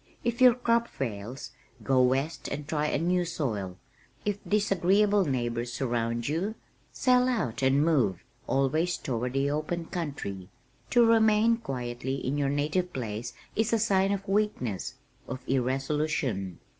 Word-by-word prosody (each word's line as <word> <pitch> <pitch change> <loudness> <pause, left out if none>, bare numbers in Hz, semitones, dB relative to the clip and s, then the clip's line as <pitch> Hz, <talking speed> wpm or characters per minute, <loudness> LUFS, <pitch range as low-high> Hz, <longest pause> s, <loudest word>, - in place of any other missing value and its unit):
"If 235 +1 -1
your 250 -2 +8
crop 235 -1 +1
fails, 120 - -5 0.3
go 130 -2 +3
west 135 +5 0
and 145 0 -5
try 150 -1 0
a - - 0
new 175 +3 +1
soil. 110 - -3 0.5
If 205 -1 -1
disagreeable 200 0 +3
neighbors 120 -3 -2
surround 120 -2 -1
you, 180 +9 -1 0.4
sell 250 0 +3
out 130 - -1
and 135 +3 +3
move, 130 - +2 0.2
always 155 +6 +1
toward 125 -2 -3
the 140 +1 +1
open 155 +3 -2
country. 135 - -5 0.4
To 240 -1 +5
remain 225 0 +4
quietly 130 - -4
in 135 0 -2
your 140 -1 +1
native 155 +6 0
place 115 -1 -4 0.2
is 220 +1 +1
a - - +5
sign 195 -3 +2
of 195 0 -3
weakness, 195 - -1 0.3
of 130 - -6
irresolution. 135 - -1
145 Hz, 140 wpm, -28 LUFS, 125-195 Hz, 0.5 s, your